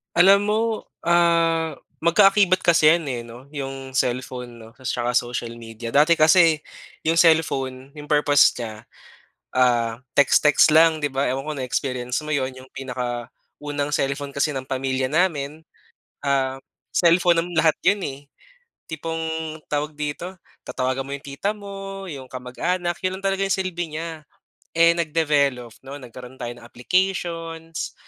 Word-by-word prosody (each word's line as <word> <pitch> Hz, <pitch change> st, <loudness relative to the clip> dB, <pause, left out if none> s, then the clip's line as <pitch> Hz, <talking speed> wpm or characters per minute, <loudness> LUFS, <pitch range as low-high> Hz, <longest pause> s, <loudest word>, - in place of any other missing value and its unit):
Alam 195 Hz, +3 st, +7 dB
mo, 215 Hz, +1 st, +2 dB, 0.4 s
ah, 170 Hz, -1 st, +2 dB, 0.2 s
magka-akibat 190 Hz, +2 st, +4 dB
kasi 165 Hz, -3 st, +5 dB
yan 170 Hz, -1 st, 0 dB
eh 125 Hz, -2 st, -3 dB
'no. 120 Hz, +4 st, -13 dB
Yung 135 Hz, -2 st, -6 dB
cellphone 125 Hz, -1 st, -2 dB
'no, 110 Hz, -, -12 dB
ta's 130 Hz, +1 st, -5 dB
tsaka 120 Hz, 0 st, -1 dB
social 120 Hz, -1 st, -3 dB
media. 115 Hz, 0 st, -8 dB
Dati 150 Hz, +5 st, +5 dB
kasi, 160 Hz, 0 st, +5 dB, 0.4 s
yung 165 Hz, +1 st, +1 dB
cellphone 135 Hz, -5 st, +2 dB
yung 150 Hz, -, -9 dB
purpose 145 Hz, -1 st, +4 dB
niya, 110 Hz, -2 st, -7 dB, 0.7 s
ah, 120 Hz, -3 st, +2 dB, 0.2 s
text-text 150 Hz, +2 st, +5 dB
lang 160 Hz, 0 st, +5 dB
'di 145 Hz, -, +1 dB
ba. 135 Hz, +1 st, 0 dB
Ewan 130 Hz, +2 st, -1 dB
ko 155 Hz, -, -1 dB
na-experience 125 Hz, -1 st, -2 dB
mo 150 Hz, -, -7 dB
yun. 135 Hz, -3 st, 0 dB
Yung 130 Hz, 0 st, -13 dB
pinaka-unang 130 Hz, +3 st, -5 dB
cellphone 140 Hz, 0 st, -1 dB
kasi 145 Hz, +2 st, +1 dB
ng 130 Hz, 0 st, -5 dB
pamilya 130 Hz, 0 st, -1 dB
namin, 155 Hz, -2 st, 0 dB, 0.6 s
ah, 135 Hz, -1 st, 0 dB, 0.3 s
cellphone 170 Hz, +3 st, +4 dB
ng 175 Hz, -, -8 dB
lahat 160 Hz, -1 st, +3 dB
yun 200 Hz, +3 st, +3 dB
eh. 135 Hz, -3 st, -5 dB, 0.6 s
Tipong, 160 Hz, 0 st, -4 dB, 0.2 s
tawag 150 Hz, +1 st, -2 dB
dito, 150 Hz, +5 st, -5 dB, 0.3 s
tatawagan 130 Hz, +1 st, -2 dB
mo 140 Hz, -, -7 dB
'yong 140 Hz, -, -17 dB
tita 140 Hz, +8 st, -2 dB
mo, 195 Hz, -1 st, -8 dB
'yong 135 Hz, -5 st, -8 dB
kamag-anak, 170 Hz, +8 st, -2 dB
yun 185 Hz, 0 st, 0 dB
lang 195 Hz, -, -16 dB
talaga 195 Hz, 0 st, 0 dB
yung 195 Hz, -, 0 dB
silbi 175 Hz, -4 st, -3 dB
niya. 160 Hz, -1 st, -6 dB, 0.5 s
Eh 170 Hz, 0 st, +6 dB
nag-develop 145 Hz, -7 st, 0 dB
'no, 140 Hz, +1 st, -7 dB
nagkaroon 125 Hz, 0 st, -11 dB
tayo 120 Hz, -, -4 dB
ng 120 Hz, -, -14 dB
applications. 165 Hz, +3 st, -2 dB
145 Hz, 145 wpm, -23 LUFS, 130-165 Hz, 0.7 s, Alam